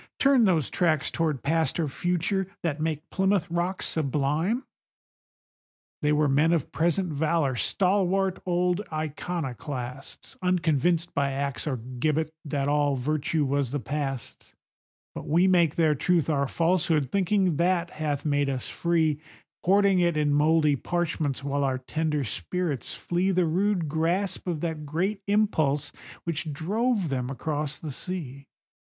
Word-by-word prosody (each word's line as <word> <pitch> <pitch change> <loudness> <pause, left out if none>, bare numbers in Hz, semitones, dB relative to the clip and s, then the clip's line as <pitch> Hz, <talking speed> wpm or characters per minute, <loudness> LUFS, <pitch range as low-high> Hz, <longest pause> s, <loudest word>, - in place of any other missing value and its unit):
Turn 270 -4 +5
those 165 - +2
tracks 155 -5 +1
toward 155 -5 -1
Past 160 +3 +1
or 160 - +1
Future, 180 +5 -1 0.2
that 155 -3 -1
make 155 0 -2
Plymouth 190 -2 +1
Rock 175 +2 -1
sublime? 155 - 0 1.4
They 150 -1 +2
were 150 0 +3
men 150 +5 +3
of 165 -5 -1
present 170 +1 +1
valor, 150 -2 +1
stalwart 190 - +1
old 180 +1 +1
iconoclasts, 145 -4 -5
Unconvinced 175 -2 +1
by 140 -1 +1
axe 140 -1 -3
or 135 -4 -1
gibbet 140 +6 -1
that 140 -1 -1
all 145 -1 +2
virtue 150 +3 0
was 140 -1 0
the 145 +3 -2
Past's; 135 -3 -5 0.6
But - - -7
we 170 +5 +4
make 175 -5 +3
their 160 -2 +3
truth 165 +2 +1
our 140 -2 +1
falsehood, 165 -4 +1
thinking 190 -4 +2
that 175 0 +1
hath 150 -2 -3
made 145 -1 +1
us 130 -2 -3
free, 160 -3 +1 0.5
Hoarding 195 0 +4
it 170 -3 +2
in 150 -1 +2
mouldy 150 0 +4
parchments, 155 -4 -2
while 140 0 -1
our 135 -1 +1
tender 150 +3 -1
spirits 140 - -3
flee 175 +2 -1
The 185 -2 +2
rude 180 +1 +1
grasp 170 +6 -1
of 165 -4 -2
that 160 -3 -3
great 185 +8 -1
Impulse 155 -9 +1 0.3
which 165 -2 -2
drove 200 - 0
them 130 -2 -2
across 150 +1 -3
the 155 - -6
sea. 140 -4 -6
160 Hz, 140 wpm, -26 LUFS, 145-180 Hz, 1.4 s, Turn